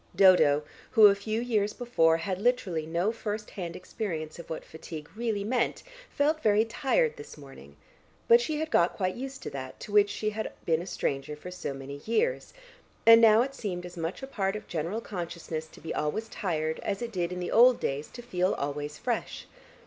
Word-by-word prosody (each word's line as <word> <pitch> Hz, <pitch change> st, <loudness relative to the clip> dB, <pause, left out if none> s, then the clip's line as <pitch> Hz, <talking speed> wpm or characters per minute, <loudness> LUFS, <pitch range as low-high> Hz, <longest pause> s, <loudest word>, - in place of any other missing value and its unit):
Dodo, 155 Hz, -7 st, +6 dB, 0.3 s
who 220 Hz, -, +7 dB
a 200 Hz, -, +9 dB
few 215 Hz, +2 st, -3 dB
years 215 Hz, -4 st, 0 dB
before 165 Hz, -10 st, +2 dB
had 185 Hz, +3 st, -3 dB
literally 190 Hz, -10 st, 0 dB
no 170 Hz, +6 st, 0 dB
first 215 Hz, -2 st, -5 dB
hand 175 Hz, -3 st, -5 dB
experience 170 Hz, -5 st, -5 dB
of 170 Hz, -, -10 dB
what 160 Hz, -, -5 dB
fatigue 160 Hz, -1 st, -9 dB
really 220 Hz, -3 st, -1 dB
meant, 240 Hz, +3 st, 0 dB, 0.3 s
felt 310 Hz, +2 st, +1 dB
very 215 Hz, +1 st, +4 dB
tired 450 Hz, -, +1 dB
this -, -, -10 dB
morning, 135 Hz, -, -13 dB, 0.5 s
but 235 Hz, +1 st, +7 dB
she 300 Hz, +5 st, -2 dB
had 315 Hz, +1 st, -3 dB
got 170 Hz, +1 st, +3 dB
quite 185 Hz, -1 st, -1 dB
used 265 Hz, +2 st, -7 dB
to -, -, -5 dB
that 130 Hz, -1 st, -7 dB
to -, -, -8 dB
which 205 Hz, 0 st, +5 dB
she 215 Hz, +1 st, -2 dB
had 220 Hz, +1 st, -4 dB
been 165 Hz, -1 st, +2 dB
a 180 Hz, -, -8 dB
stranger 140 Hz, -3 st, -2 dB
for 180 Hz, +5 st, -9 dB
so 180 Hz, -5 st, -4 dB
many 135 Hz, +1 st, -7 dB
years, 460 Hz, -, 0 dB, 0.5 s
and 230 Hz, 0 st, +9 dB
now 225 Hz, 0 st, +7 dB
it 275 Hz, +1 st, -5 dB
seemed 185 Hz, -9 st, -4 dB
as 175 Hz, 0 st, -9 dB
much 170 Hz, +8 st, -4 dB
a -, -, -1 dB
part 195 Hz, -6 st, -2 dB
of 210 Hz, -, -6 dB
general 170 Hz, +7 st, -3 dB
consciousness 170 Hz, -5 st, -5 dB
to -, -, -16 dB
be 160 Hz, -, -5 dB
always 150 Hz, +10 st, -2 dB
tired 160 Hz, -7 st, -2 dB
as 200 Hz, +3 st, -3 dB
it 235 Hz, -, -4 dB
did 180 Hz, -4 st, -2 dB
in 180 Hz, -, -4 dB
the 180 Hz, -, -3 dB
old 245 Hz, +2 st, +6 dB
days 140 Hz, +2 st, -2 dB
to 240 Hz, -, -11 dB
feel 185 Hz, -5 st, 0 dB
always 145 Hz, +1 st, -4 dB
fresh. -, -, -3 dB
190 Hz, 200 wpm, -28 LUFS, 160-230 Hz, 0.5 s, a